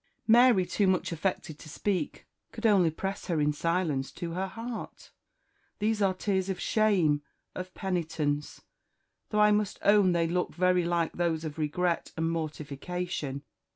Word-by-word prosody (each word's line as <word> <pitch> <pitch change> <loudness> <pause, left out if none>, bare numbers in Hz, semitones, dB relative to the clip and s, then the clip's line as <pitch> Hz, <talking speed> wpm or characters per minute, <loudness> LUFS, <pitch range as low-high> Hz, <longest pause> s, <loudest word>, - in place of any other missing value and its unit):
Mary, 235 -4 +6
too 200 +2 +1
much 185 -1 +1
affected 165 -2 -3
to - - -11
speak, 180 0 -2 0.3
could 230 0 -6
only 195 -6 +5
press 195 +5 -5
her 170 -4 0
in 150 0 +2
silence 160 -4 0
to 170 -1 -5
her 185 +3 -2
heart. 230 +4 -7 0.7
"These 215 0 0
are 190 -2 +2
tears 190 0 -1
of 190 - -2
shame, 185 -9 +2 0.3
of 185 0 -6
penitence, 155 -5 -2 0.7
though 210 -1 +2
I 210 0 +6
must 210 -1 +1
own 200 -3 +5
they 170 -1 +2
look 180 0 -1
very 180 0 +3
like 170 -1 0
those 165 -2 -1
of 155 0 -6
regret 170 +3 -1
and 165 +1 0
mortification. 155 -1 -4
180 Hz, 155 wpm, -29 LUFS, 160-195 Hz, 0.7 s, Mary